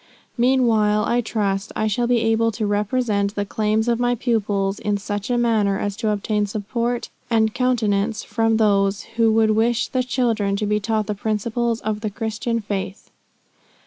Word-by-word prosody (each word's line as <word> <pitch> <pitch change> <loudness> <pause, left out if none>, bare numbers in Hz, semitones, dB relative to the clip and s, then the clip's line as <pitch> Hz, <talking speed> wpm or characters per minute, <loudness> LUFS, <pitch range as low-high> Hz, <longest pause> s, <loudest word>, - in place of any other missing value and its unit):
Meanwhile 230 -4 +3
I 240 +1 +1
trust, 205 -2 -2
I 215 - 0
shall 225 +3 0
be 240 -1 +2
able 225 0 +2
to 215 0 -2
represent 205 0 0
the 205 - -1
claims 215 +2 0
of 235 -1 +1
my 245 0 +2
pupils 205 -4 -1
in 205 -1 -1
such 205 +1 -4
a 245 - +1
manner, 220 -5 +2
as 205 0 -3
to 225 -2 -1
obtain 210 0 0
support 235 +4 -2 0.2
and 220 -2 +2
countenance 220 -4 0
from 225 -1 +1
those, 200 -2 +2
who 225 -1 +4
would 220 -1 +3
wish 230 +2 +1
the 255 - 0
children 230 -5 0
to 210 +1 -1
be 210 0 +1
taught 215 0 -1
the 210 - -2
principles 225 +3 -1
of 215 0 -2
the 215 - -2
Christian 230 +2 -3
faith. 200 -2 -5
220 Hz, 175 wpm, -21 LUFS, 205-235 Hz, 0.2 s, who